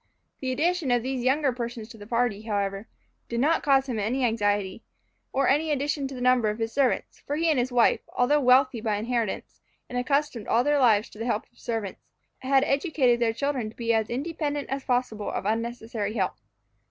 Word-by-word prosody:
The 260 Hz, -1 st, -2 dB
addition 325 Hz, +2 st, 0 dB
of 245 Hz, -1 st, +2 dB
these 260 Hz, -1 st, -2 dB
younger 270 Hz, +1 st, +2 dB
persons 235 Hz, -2 st, -5 dB
to 230 Hz, -, -12 dB
the 205 Hz, -, -10 dB
party, 235 Hz, -3 st, 0 dB
however, 200 Hz, -1 st, -2 dB, 0.4 s
did 235 Hz, -, -2 dB
not 310 Hz, +6 st, +3 dB
cause 270 Hz, -1 st, +3 dB
him 235 Hz, -4 st, -2 dB
any 245 Hz, +5 st, 0 dB
anxiety, 205 Hz, -3 st, 0 dB, 0.5 s
or 270 Hz, 0 st, +1 dB
any 300 Hz, +4 st, +2 dB
addition 285 Hz, -1 st, -1 dB
to 270 Hz, -, -8 dB
the 250 Hz, -, -7 dB
number 250 Hz, -3 st, +3 dB
of 210 Hz, -, -3 dB
his 225 Hz, 0 st, -2 dB
servants; 270 Hz, -3 st, 0 dB
for 290 Hz, -, -4 dB
he 325 Hz, +1 st, +2 dB
and 290 Hz, -, +2 dB
his 250 Hz, +1 st, -1 dB
wife, 240 Hz, -2 st, +4 dB, 0.2 s
although 285 Hz, +4 st, +3 dB
wealthy 255 Hz, -2 st, +4 dB
by 215 Hz, -2 st, 0 dB
inheritance, 230 Hz, 0 st, -3 dB, 0.3 s
and 245 Hz, -, -3 dB
accustomed 275 Hz, -4 st, -1 dB
all 235 Hz, -, +3 dB
their 290 Hz, +1 st, +2 dB
lives 220 Hz, -5 st, +4 dB
to 210 Hz, -, -14 dB
the 230 Hz, -, -3 dB
help 220 Hz, -2 st, 0 dB
of 240 Hz, -, -26 dB
servants, 225 Hz, -5 st, -4 dB, 0.4 s
had 270 Hz, +1 st, +3 dB
educated 275 Hz, -4 st, +2 dB
their 235 Hz, -1 st, +2 dB
children 255 Hz, -2 st, -2 dB
to 220 Hz, -, -15 dB
be 230 Hz, -1 st, 0 dB
as 220 Hz, -1 st, +1 dB
independent 290 Hz, +2 st, -3 dB
as 270 Hz, 0 st, -3 dB
possible 245 Hz, -5 st, -1 dB
of -, -, -4 dB
unnecessary 225 Hz, -1 st, -2 dB
help. 190 Hz, -4 st, 0 dB
245 Hz, 200 wpm, -26 LUFS, 225-275 Hz, 0.5 s, wife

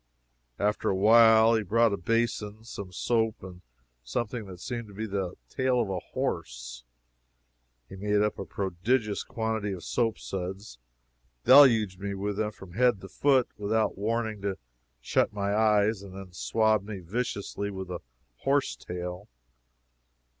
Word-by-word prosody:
After 105 Hz, +1 st, 0 dB
a -, -, +1 dB
while 110 Hz, +2 st, +6 dB
he 110 Hz, -, +2 dB
brought 115 Hz, +2 st, +3 dB
a -, -, +2 dB
basin, 110 Hz, +1 st, -1 dB
some 100 Hz, -5 st, -8 dB
soap, 115 Hz, +1 st, 0 dB
and 90 Hz, -1 st, -10 dB, 0.4 s
something 110 Hz, -, -3 dB
that 90 Hz, -2 st, -10 dB
seemed 120 Hz, +1 st, -5 dB
to 100 Hz, -, -13 dB
be 110 Hz, +2 st, -3 dB
the 95 Hz, -3 st, -3 dB
tail 130 Hz, -2 st, +1 dB
of 110 Hz, -5 st, 0 dB
a 95 Hz, -, -1 dB
horse. -, -, -4 dB, 1.0 s
He -, -, -10 dB
made 105 Hz, +1 st, +1 dB
up 105 Hz, -, -1 dB
a 95 Hz, -, -4 dB
prodigious 100 Hz, +5 st, -1 dB
quantity 110 Hz, -2 st, -2 dB
of 90 Hz, -, -7 dB
soap 115 Hz, -3 st, 0 dB
suds, 95 Hz, -, -6 dB, 0.7 s
deluged 115 Hz, -9 st, +7 dB
me 100 Hz, 0 st, -3 dB
with 100 Hz, +1 st, -3 dB
them 110 Hz, 0 st, 0 dB
from 95 Hz, -3 st, -13 dB
head 120 Hz, 0 st, +3 dB
to 95 Hz, -, -10 dB
foot, 135 Hz, -3 st, +3 dB
without 105 Hz, +1 st, +1 dB
warning 110 Hz, +1 st, -1 dB
me 100 Hz, +1 st, -2 dB
to -, -, -15 dB, 0.4 s
shut -, -, +1 dB
my 100 Hz, -1 st, -1 dB
eyes, 105 Hz, -1 st, +3 dB
and 95 Hz, -2 st, -11 dB
then 95 Hz, -2 st, -9 dB
swabbed 110 Hz, +2 st, +1 dB
me 105 Hz, -2 st, -5 dB
viciously 100 Hz, +1 st, -3 dB
with 95 Hz, -2 st, -6 dB
the 90 Hz, -1 st, -4 dB, 0.4 s
horse 140 Hz, -, +1 dB
tail. 90 Hz, +2 st, -6 dB
105 Hz, 155 wpm, -28 LUFS, 95-115 Hz, 1.0 s, deluged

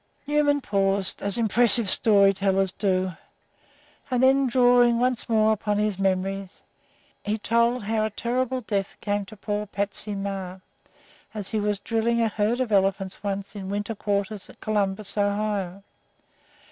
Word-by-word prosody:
Newman 290 Hz, 0 st, +2 dB
paused, 195 Hz, -3 st, 0 dB
as 200 Hz, +1 st, +1 dB
impressive 230 Hz, -1 st, +3 dB
story 200 Hz, 0 st, +4 dB
tellers 195 Hz, -1 st, +1 dB
do, 185 Hz, -2 st, 0 dB, 1.0 s
and 250 Hz, -1 st, +1 dB
then, 270 Hz, +1 st, +4 dB
drawing 245 Hz, -1 st, +4 dB
once 250 Hz, 0 st, 0 dB
more 220 Hz, -1 st, +4 dB
upon 210 Hz, -1 st, -1 dB
his 210 Hz, -2 st, -1 dB
memories, 195 Hz, 0 st, -2 dB, 0.6 s
he 210 Hz, +1 st, -2 dB
told 235 Hz, +2 st, +1 dB
how 215 Hz, +1 st, 0 dB
a -, -, -1 dB
terrible 255 Hz, +4 st, -2 dB
death 200 Hz, -3 st, -3 dB
came 205 Hz, -1 st, -2 dB
to 210 Hz, +3 st, -13 dB
poor 210 Hz, +1 st, -3 dB
"Patsy" 205 Hz, +1 st, -3 dB
Meagher 190 Hz, -2 st, -5 dB, 0.7 s
as 205 Hz, -3 st, -4 dB
he 220 Hz, -, -1 dB
was 205 Hz, -1 st, -1 dB
drilling 230 Hz, +2 st, 0 dB
a 230 Hz, -1 st, +2 dB
herd 215 Hz, +3 st, 0 dB
of 250 Hz, -4 st, -1 dB
elephants 195 Hz, -1 st, +1 dB
once 200 Hz, 0 st, -4 dB
in 190 Hz, -2 st, -6 dB
winter 205 Hz, +2 st, -3 dB
quarters 200 Hz, -1 st, -3 dB
at -, -, -16 dB
Columbus, 205 Hz, -1 st, -1 dB
Ohio. 200 Hz, -2 st, -1 dB
205 Hz, 145 wpm, -25 LUFS, 195-230 Hz, 1.0 s, story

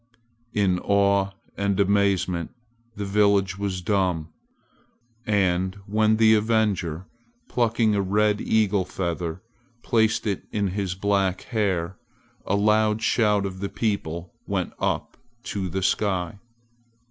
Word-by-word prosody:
In 95 Hz, -3 st, +2 dB
awe 100 Hz, 0 st, +2 dB, 0.3 s
and 100 Hz, -1 st, 0 dB
amazement 100 Hz, -1 st, +1 dB, 0.4 s
the 100 Hz, -, -4 dB
village 100 Hz, -1 st, +2 dB
was 95 Hz, -2 st, -3 dB
dumb. 90 Hz, -5 st, 0 dB, 1.0 s
And 95 Hz, -2 st, +1 dB
when 110 Hz, +1 st, +2 dB
the 110 Hz, 0 st, +6 dB
avenger, 105 Hz, -6 st, +1 dB, 0.4 s
plucking 115 Hz, -2 st, +1 dB
a 100 Hz, -, +1 dB
red 105 Hz, +2 st, +1 dB
eagle 105 Hz, -3 st, +2 dB
feather, 85 Hz, -1 st, -4 dB, 0.4 s
placed 110 Hz, -2 st, +2 dB
it 100 Hz, -3 st, -2 dB
in 100 Hz, -2 st, 0 dB
his 95 Hz, -1 st, -2 dB
black 95 Hz, -1 st, 0 dB
hair, 95 Hz, -6 st, -1 dB, 0.5 s
a 100 Hz, -, +2 dB
loud 105 Hz, +1 st, +2 dB
shout 105 Hz, -4 st, +2 dB
of 95 Hz, -1 st, -5 dB
the 100 Hz, 0 st, -3 dB
people 90 Hz, -6 st, -3 dB
went -, -, -2 dB
up -, -, -2 dB, 0.3 s
to 95 Hz, -2 st, -3 dB
the 95 Hz, +3 st, -3 dB
sky. 95 Hz, -1 st, 0 dB
100 Hz, 120 wpm, -24 LUFS, 95-105 Hz, 1.0 s, the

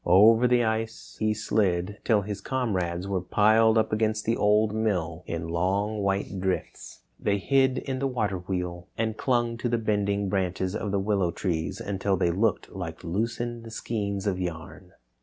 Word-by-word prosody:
Over 110 Hz, +7 st, +6 dB
the 120 Hz, -1 st, +3 dB
ice 110 Hz, 0 st, -3 dB
he 110 Hz, 0 st, +2 dB
slid 100 Hz, -2 st, 0 dB
till 110 Hz, -3 st, +3 dB
his 105 Hz, 0 st, -5 dB
comrades 95 Hz, -9 st, -1 dB
were 95 Hz, -2 st, -1 dB
piled 110 Hz, +4 st, +4 dB
up 110 Hz, -1 st, +1 dB
against 110 Hz, 0 st, 0 dB
the 115 Hz, -, +2 dB
Old 105 Hz, +1 st, +3 dB
Mill 90 Hz, -6 st, -1 dB
in 85 Hz, 0 st, -3 dB
long 100 Hz, +5 st, 0 dB
white 100 Hz, 0 st, -1 dB
drifts. 95 Hz, 0 st, -3 dB, 0.2 s
They 100 Hz, -1 st, +1 dB
hid 130 Hz, +5 st, +2 dB
in 130 Hz, -1 st, -3 dB
the 135 Hz, -, +1 dB
water 105 Hz, -7 st, -1 dB
wheel 90 Hz, -1 st, -4 dB
and 110 Hz, -1 st, -1 dB
clung 120 Hz, -1 st, 0 dB
to 120 Hz, -, -1 dB
the 120 Hz, -, +1 dB
bending 100 Hz, -2 st, 0 dB
branches 95 Hz, 0 st, -1 dB
of 105 Hz, -, -2 dB
the 100 Hz, -, 0 dB
willow 100 Hz, -3 st, +1 dB
trees 85 Hz, -2 st, -2 dB
until 95 Hz, 0 st, -1 dB
they 85 Hz, -1 st, +2 dB
looked 105 Hz, +3 st, 0 dB
like 85 Hz, -4 st, -6 dB
loosened 115 Hz, +5 st, -3 dB
skeins 100 Hz, -4 st, -3 dB
of 95 Hz, -3 st, 0 dB
yarn. 80 Hz, -3 st, -6 dB
105 Hz, 170 wpm, -27 LUFS, 95-110 Hz, 0.2 s, Over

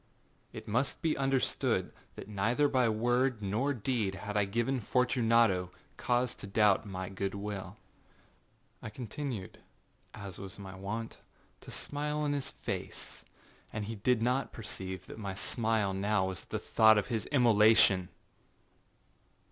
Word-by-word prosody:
It -, -, -9 dB
must 125 Hz, +6 st, -1 dB
be 160 Hz, -2 st, +2 dB
understood, 135 Hz, -1 st, 0 dB, 0.2 s
that -, -, -8 dB
neither 110 Hz, +8 st, +2 dB
by 130 Hz, -4 st, +3 dB
word 120 Hz, +2 st, +1 dB
nor 110 Hz, +9 st, 0 dB
deed 115 Hz, -6 st, -1 dB
had 105 Hz, +2 st, -6 dB
I 105 Hz, -1 st, +3 dB
given 120 Hz, +6 st, 0 dB
Fortunato 115 Hz, -6 st, +3 dB, 0.3 s
cause 125 Hz, 0 st, +1 dB
to -, -, -8 dB
doubt 105 Hz, 0 st, +3 dB
my 95 Hz, -1 st, -4 dB
good 95 Hz, +1 st, -3 dB
will. 100 Hz, -1 st, -5 dB, 1.0 s
I -, -, -6 dB
continued, 120 Hz, -2 st, -5 dB, 0.6 s
as 100 Hz, -3 st, -8 dB
was 95 Hz, -2 st, -8 dB
my 95 Hz, -2 st, -8 dB
wont, 105 Hz, +4 st, -5 dB, 0.4 s
to -, -, -13 dB
smile 150 Hz, +1 st, -2 dB
in 145 Hz, -, +1 dB
his 140 Hz, -2 st, -2 dB
face, -, -, -6 dB, 0.5 s
and 110 Hz, -1 st, -3 dB
he 110 Hz, -, -4 dB
did 115 Hz, +2 st, +1 dB
not 125 Hz, +3 st, +1 dB
perceive 95 Hz, -4 st, -6 dB
that -, -, -10 dB
my 100 Hz, -3 st, -4 dB
smile 110 Hz, -1 st, 0 dB
now 95 Hz, -1 st, +1 dB
was 90 Hz, -5 st, -6 dB
at -, -, -34 dB
the -, -, -1 dB
thought 110 Hz, -1 st, +5 dB
of 105 Hz, -, 0 dB
his 115 Hz, -4 st, -2 dB
immolation. 110 Hz, -7 st, +5 dB
110 Hz, 145 wpm, -32 LUFS, 100-125 Hz, 1.0 s, thought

